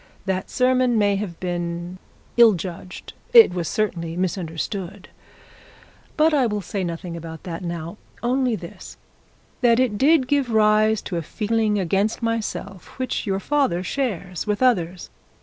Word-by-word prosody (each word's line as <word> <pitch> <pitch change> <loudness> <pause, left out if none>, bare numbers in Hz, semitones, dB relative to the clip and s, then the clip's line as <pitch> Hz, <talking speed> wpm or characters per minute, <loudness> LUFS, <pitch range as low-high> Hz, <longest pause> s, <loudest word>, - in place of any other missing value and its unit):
That 190 -1 -2
sermon 255 -2 +2
may 205 -1 +3
have 190 -5 -5
been 175 0 -4 0.4
ill 235 -2 +7
judged, 180 0 -7 0.2
it 460 - +9
was 175 -3 -2
certainly 170 -3 -2
misunderstood; 185 +2 -4 1.1
but 315 +1 +4
I 270 -5 +3
will 210 -1 -2
say 195 +2 -3
nothing 170 0 -5
about 165 -1 -8
that 170 0 -6
now; 170 +2 -5 0.3
only 250 -1 +1
this, 170 -4 -10 0.6
that 240 -1 +4
it 230 -6 +1
did 285 -2 +4
give 280 -2 +1
rise 215 -1 +3
to 175 - -4
a - - -1
feeling 215 +4 0
against 195 +5 0
myself 210 -4 -4
which 255 -3 -2
your 195 -1 0
father 200 -8 0
shares 190 - -3
with 210 +4 0
others. 180 -8 +1
200 Hz, 145 wpm, -23 LUFS, 175-235 Hz, 1.1 s, it